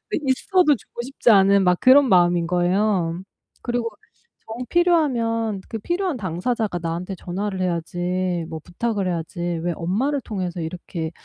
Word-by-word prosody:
네, - - +1
있어도 300 +4 +3
주고 235 - -9
싶지 250 -1 +1
않은 195 -1 +5
막 180 -1 +3
그런 265 +1 +6
마음인 175 -2 +4
거예요. 180 0 +1 0.4
그리고 240 -1 -1 0.6
정 235 +3 -5
필요하면 235 - +1
그 225 - -4
필요한 345 - -2
당사자가 205 +1 -2
나한테 175 +3 -4
전화를 190 +2 -4
해야지 175 0 -2
뭐 160 -1 -6
부탁을 200 +1 -2
해야지 170 +1 -4
'왜 175 0 -1
엄마를 255 - -1
통해서 185 -4 -4
이렇게 165 0 -5
190 Hz, 325 characters per minute, -22 LUFS, 175-240 Hz, 0.6 s, 그런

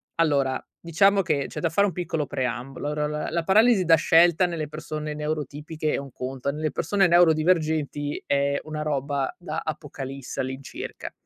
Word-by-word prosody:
allora 140 -5 +1 0.2
diciamo 195 +4 +3
che 150 -6 0
c'è - - -7
da 165 - 0
fare 200 +5 +3
un 190 - -3
piccolo 165 -3 -2
preambolo. 130 +1 -3
Ora 150 0 -1
la 150 0 -3
la 170 0 0
paralisi 215 +3 +5
da 165 -1 +7
scelta 170 +2 +4
nelle 165 -3 -3
persone 155 0 -5
neurotipiche 150 +1 -3
è - - +1
un 140 -1 -7
conto, 130 +2 -4
nelle 155 +2 -2
persone 195 +6 +2
neurodivergenti 155 -3 +2
è 140 0 +1
una 155 0 -4
roba 140 -2 -1
da 160 -3 -4
apocalisse 140 -4 -6
all'incirca. 130 +1 -5
155 Hz, 160 wpm, -25 LUFS, 140-165 Hz, 0.2 s, da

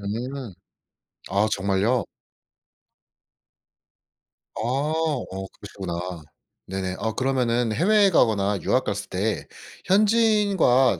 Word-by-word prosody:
음 120 +4 -5 0.8
아 100 +2 +2
정말요? 100 +4 +1 2.5
아 - - -4
어 145 +3 -1 0.3
그러시구나. 95 -4 -6 0.7
네네. 95 -1 -3
아 110 -1 -2
그러면은 125 -3 0
해외에 200 - +4
가거나 105 - +2
유학 130 - +2
갔을 100 0 -3
때 100 +3 -2 0.4
현지인과 200 - +3
120 Hz, 185 characters per minute, -24 LUFS, 100-155 Hz, 2.5 s, 해외에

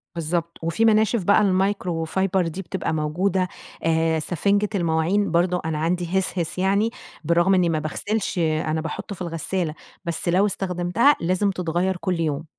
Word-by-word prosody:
بالضبط، 170 +1 -2
وفي 170 +8 +1
مناشف 220 -1 +3
بقى 200 +4 +4
المايكروفايبر 190 -2 0
دي 165 +4 -5
بتبقى 170 - -3
موجودة 180 +5 0 0.4
آآ، 160 0 +2
سفنجة 200 +6 0
المواعين 175 +3 +1
برضه، 175 +1 +2
أنا 160 -1 -1
عندي 175 +3 0
هِسهِس 180 -3 -3
يعني 200 +4 +2 0.3
برغم 170 +4 +3
إني 180 -2 +3
ما 160 -2 0
باغسلش، 200 +7 -2
أنا 155 -1 0
باحطه 165 +5 -5
في 185 - -14
الغسالة، 170 0 -2 0.3
بس 170 +1 -2
لو 185 +4 +4
استخدمتها 190 +7 +2
لازم 185 +4 +1
تتغيّر 180 +1 -1
كل 180 -1 -2
يوم. 155 -1 -1
175 Hz, 150 wpm, -23 LUFS, 165-195 Hz, 0.4 s, بقى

